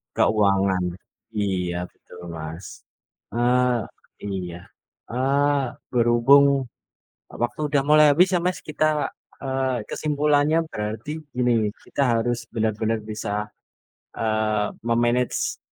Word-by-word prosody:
Keuangan. 100 -3 +3 0.5
Iya 90 -4 -1 0.2
betul 90 - -16 0.2
Mas. 80 +3 -7 0.7
Eee, 125 0 +2 0.4
iya. 90 -3 -4 0.5
Eee, 140 +1 +1 0.2
berhubung 120 +4 +5 0.9
waktu 120 +5 -3
udah 140 -2 +3
mulai 155 0 +7
habis 180 +6 +4
ya - - +3
Mas, 180 - 0
kita, 155 0 +1 0.3
eee, 130 -3 -1
kesimpulannya 150 +1 +2
berarti 105 +7 -4 0.2
gini, 115 -4 +2
kita - - -3 0.2
harus 120 +1 0 0.2
benar-benar 110 0 0
bisa, 105 -1 -4 0.9
eee, 110 -1 0 0.2
me-manage 120 +1 +1
120 Hz, 95 wpm, -24 LUFS, 105-140 Hz, 0.9 s, mulai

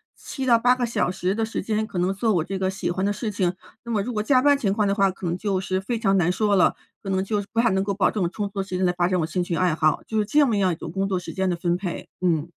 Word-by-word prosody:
7 265 -2 -6
到 235 -2 +5
8 245 +2 +4
个 250 -1 -1
小 230 -6 0
时 185 +1 -1
的 225 0 0
时 225 - -4
间 215 +2 -1
可 190 -4 -5
能 180 +2 +1
做 220 +2 +1
我 170 -4 +1
这 195 +3 -4
个 190 0 0
喜 190 - -3
欢 190 +2 -1
的 205 - +1
事 210 +2 -3
情。 185 -3 0 0.3
那 235 - -6
么 210 -3 +1
如 245 - -4
果 210 -1 -1
加 255 +2 +4
班 285 +1 +4
情 200 -8 0
况 210 -1 +1
的 200 - +1
话， 195 -2 +3
可 185 -1 -6
能 170 +1 -1
就 195 -1 -1
是 190 0 -1
非 225 +4 -3
常 195 -3 +2
难 175 0 +2
说 205 +1 +1
了， 185 - +4 0.3
可 195 - -6
能 190 0 +1
就 210 +1 -1
是 200 - -11
不 230 - +1
太 235 - +3
能 190 0 +1
够 200 0 -1
保 195 - +2
证 210 - -2
有 170 - 0
充 205 +2 -3
足 195 0 -6
的 - - 0
时 185 - -4
间 185 - +1
来 180 - +2
发 175 -1 +2
展 185 0 +1
我 160 - +1
兴 180 +2 -2
趣 175 - -2
爱 180 -2 +2
好。 155 -2 +1
就 220 - -3
是 210 - +1
这 290 +7 +4
么 225 -5 +1
样 190 -2 +2
一 - - -4
种 - - -7
工 195 0 -1
作 190 -2 0
时 180 - -6
间 190 -1 0
的 175 - 0
分 175 0 0
配， 180 -2 -5
嗯。 170 -3 +1
195 Hz, 365 characters per minute, -24 LUFS, 180-215 Hz, 0.3 s, 到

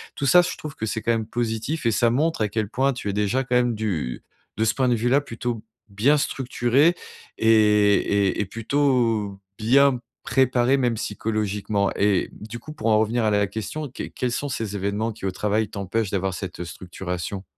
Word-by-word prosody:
Tout 140 - -2
ça, 175 +6 +7
je 175 - -3
trouve 150 -2 -8
que 110 - -3
c'est 110 - -2
quand 115 - +2
même 110 -2 -1
positif 120 +6 -2
et 115 - +4
ça 115 +2 +3
montre 150 +4 0
à 105 - +2
quel 110 0 -1
point 135 +4 +1
tu 120 - -6
es - - -1
déjà 105 +6 +1
quand 125 - -1
même 120 -1 +2
du 90 - -3 0.3
de 110 - +1
ce 110 - +2
point 130 -2 +1
de 120 - +3
vue-là, 120 +5 +2
plutôt 115 -3 -4 0.3
bien 115 +10 +3
structuré 135 +3 +2 0.4
et 110 - 0 0.5
et 100 -2 +1
et - - -1
plutôt 115 -3 0 0.2
bien 130 +3 +4 0.2
préparé, 130 0 +2
même 125 -3 +1
psychologiquement. 105 -1 -1
Et 100 -2 +2
du 110 +3 -8
coup, 155 +6 -10
pour 115 -7 -4
en 110 -1 +5
revenir 115 +2 +1
à 105 - +2
la 105 0 +3
question, 135 +9 -5
que 125 - -7
quels 125 -2 -3
sont 145 +4 -2
ces 110 -5 -3
événements, 100 +3 -1
qui 105 - -8
au 95 - -1
travail, 105 +2 0
t'empêchent 100 +1 -2
d'avoir 95 -1 -1
cette 90 -1 -6
structuration? 90 +2 -6
110 Hz, 200 wpm, -24 LUFS, 105-125 Hz, 0.5 s, ça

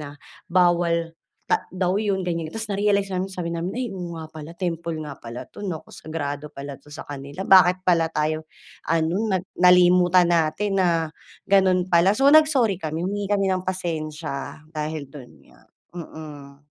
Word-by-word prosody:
na, 145 -1 -8 0.3
bawal 170 -2 +2 0.4
ta - - +1
daw 185 +1 0
yun, 205 -2 0
ganyan-ganyan. 165 -2 -3
Tapos 225 -1 -3
narealize 200 0 +1
namin 190 0 -3
sabi 180 -2 -4
namin, 170 +2 -3
"Ay, 250 0 -3
oo 180 -4 -6
nga 160 - -8
pala, 155 0 -9
temple 170 -2 -3
nga 150 -3 -7
pala 120 +2 -9
'to, 205 - -9
naku, 165 -5 -5
sagrado 150 -2 -5
pala 140 0 -7
'to 145 +2 -17
sa 150 - -9
kanila. 140 +3 -8
Bakit 185 0 +6
pala 165 -2 +3
tayo 155 +1 -1 0.4
ano, 165 +1 +1 0.2
nag 185 0 -1
nalimutan 180 0 +5
natin 175 +5 +1
na 170 -4 +2 0.4
gano'n 185 -2 +3
pala." 175 +2 +4
So 270 +6 +3
nag 310 +2 +8
sorry 250 -10 +1
kami, 160 -2 -4
humingi 200 +3 -2
kami 195 -1 +2
ng 185 -1 -1
pasensya 155 -5 -4 0.2
dahil 150 -2 -4
do'n 135 -3 -12 0.2
nga. - - -21 0.4
Mm. 145 -4 -10
170 Hz, 170 wpm, -23 LUFS, 155-190 Hz, 0.4 s, nag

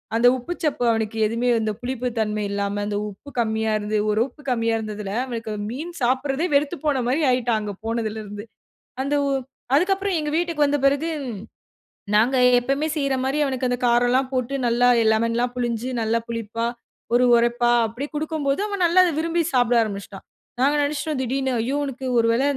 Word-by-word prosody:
அந்த 235 +2 +5
உப்பு 255 +8 -5
சப்பு 300 -5 0
அவனுக்கு 225 -1 -2
எதுவுமே, 230 +3 0
அந்த 215 -1 -1
புளிப்பு 250 0 -3
தன்மை 210 -1 -1
இல்லாம, 200 0 -2
அந்த 205 -1 -2
உப்பு 205 +8 -12
கம்மியா 220 -1 0
இருந்து, 210 +1 -1
ஒரு 210 - +1
உப்பு 295 - -18
கம்மியா 230 -2 +1
இருந்ததுல 210 -2 -5
அவனுக்கு 230 -3 -5 0.2
மீன் 310 +9 -6
சாப்பறதே 270 +6 +1
வெறுத்து 290 +4 +2
போன 280 -3 +2
மாரி 275 +6 +1
ஆயிட்டான் 245 -3 +1
அங்க 205 -1 -4
போனதுல 225 -1 -2
இருந்து. 205 +1 -8 0.6
அந்த 280 +2 0
உ - - 0 0.5
அதுக்கு 365 +7 +3
அப்பறம் 390 -2 -1
எங்க 300 -1 -2
வீட்டுக்கு 335 -3 +1
வந்த 290 0 +1
பிறகு, 280 +4 +2 1.1
நாங்க 235 +5 +4 0.2
எப்பமே 275 +5 0
செய்ற 275 -2 0
மாரி 270 +3 0
அவனுக்கு 260 -2 -1
அந்த 245 0 -1
காரம்லா 245 +2 +3
போட்டு 255 +1 -1
நல்லா 240 +1 +3 0.2
லெமன்லாம் 230 +2 0
புளிஞ்சு 240 0 -2
நல்லா 225 +1 +1
புளிப்பா, 230 0 -3 0.5
ஒரு 250 +1 +5
உரப்பா 240 +1 +2 0.2
அப்டி 240 +6 -5
குடுக்கும்போது 300 0 -1
அவன் 400 -3 -3
நல்லா 345 +2 +5
அத 355 - +2
விரும்பி 335 +1 +1
சாப்ட 245 -1 +3
ஆரம்பிச்சுட்டான். 200 -2 -6 0.4
நாங்க 280 +3 +3
நினச்சுட்டோம் 290 0 -2
"திடீருனு 265 +1 -1
ஐயோ! 260 +5 -1
உனக்கு 265 -1 -5
ஒரு 230 - +3
வேள 235 +3 +1
245 Hz, 175 wpm, -23 LUFS, 225-280 Hz, 1.1 s, அந்த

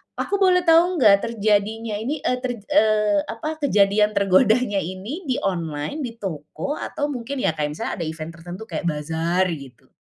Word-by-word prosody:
aku 400 - -1
boleh 365 -2 +4
tau 335 +1 +6
nggak 215 -10 +6
terjadinya 220 0 0
ini, 275 +6 -3
eee, 250 - +1
ter 255 0 -2
eee, 215 -6 +3
apa, 310 +7 -5
kejadian 210 -5 +3
tergodanya 200 +3 +3
ini 195 - -6
di 255 - +1
online, 165 - -2
di 230 -2 -7
toko, 195 - -5
atau 290 0 -3
mungkin, 260 +1 -4
ya, - - +3
kayak 150 -1 -2
misalnya - - -3
ada 170 - -2
event 160 +1 -6
tertentu 175 +5 -8
kayak 175 - -3
bazar, 165 +4 0
gitu? 140 -7 -9
210 Hz, 170 wpm, -22 LUFS, 170-255 Hz, -, tau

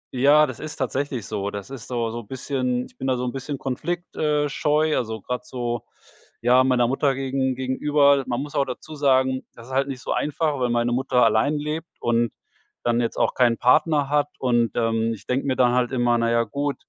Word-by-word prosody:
Ja, 145 +4 +6
das 130 -5 -7
ist 155 - -6
tatsächlich 130 -3 -2
so. 100 -2 -3
Das 100 +4 -7
ist 135 -4 -8
so 115 -2 -2
so 120 - -5
bisschen 125 +1 -2
ich - - -19
bin 135 - -3
da 130 -1 +1
so 125 - -2
'n 125 - -2
bisschen 135 +2 -5
Konflikt 160 +8 -4
äh, 150 -1 +1
scheu, 150 +2 +1
also 110 -2 -2
grad 125 +5 -4
so, 120 -2 -4 0.6
ja, 125 +2 +5
meiner 125 -2 +3
Mutter 135 +1 +1
gegen 130 -1 -1
gegenüber. 140 +2 +2
Man 120 - -1
muss 145 - -9
aber 140 - +1
dazu 130 +5 -7
sagen, 130 -2 +2
das 115 +1 -13
ist 130 - -7
halt 135 +1 +1
nicht 130 -2 -6
so - - -4
einfach, 150 -1 -1
weil 125 -1 +1
meine 120 0 +1
Mutter 125 0 +2
allein 115 +7 +2
lebt 150 +3 -4
und 120 -1 +1 0.5
dann 120 0 +2
jetzt 115 - -2
auch - - +2
keinen 120 -2 +3
Partner 145 +2 +3
hat, 145 -1 +2
und, 120 -3 +2
ähm, 115 -1 +1
ich 105 - -16
denke 135 +2 -1
mir 130 - +1
dann 125 -1 +4
halt 125 0 +1
immer: 120 -2 +2
„Na 115 0 +1
ja, 115 0 +3
gut, 140 +5 -2
130 Hz, 215 wpm, -23 LUFS, 120-140 Hz, 0.6 s, Ja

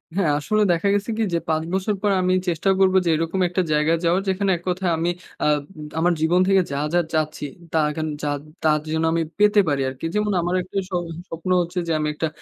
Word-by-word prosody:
হ্যাঁ, 180 -6 +2
আসলে 215 +7 0
দেখা 170 +3 +1
গেছে 205 +3 -1
কি? 225 - +1
যে - - +3
৫ 160 0 +1
বছর 195 +2 0
পর 205 -1 +2
আমি 185 0 +2
চেষ্টা 175 +2 0
করবো 190 0 +4
যে 170 - +2
এরকম 165 +4 -1
একটা 180 +2 0
জায়গায় 150 +2 +2
যাওয়ার 175 +3 +3
যেখানে 190 +1 +1
এক - - -14
কথায় 180 0 0
আমি 170 +2 0 0.3
আ - - +2
আব 150 -1 +3 0.4
আমার 175 +2 +3
জীবন 170 +3 +3
থেকে 195 -1 +5
যা, 140 - -2 0.2
যা 175 - +4
চাচ্ছি, 155 -1 -1 0.3
তা - - 0
এখেন 155 +1 -3
যা 150 - -2 0.4
তা 160 - +4 0.2
যেন 160 0 0
আমি 165 0 +1 0.2
পেতে 210 0 +5
পারি 140 -2 +1
আরকি। 130 +4 -7
যেমন 210 0 +1
আমার 175 +2 -1
একটা 185 +2 -7
স - - -43 0.4
স্বপ্ন 165 +3 -6
হচ্ছে 175 +1 -3
যে - - -1
আমি 150 - 0
একটা 160 +2 -2
175 Hz, 225 wpm, -22 LUFS, 160-190 Hz, 0.4 s, থেকে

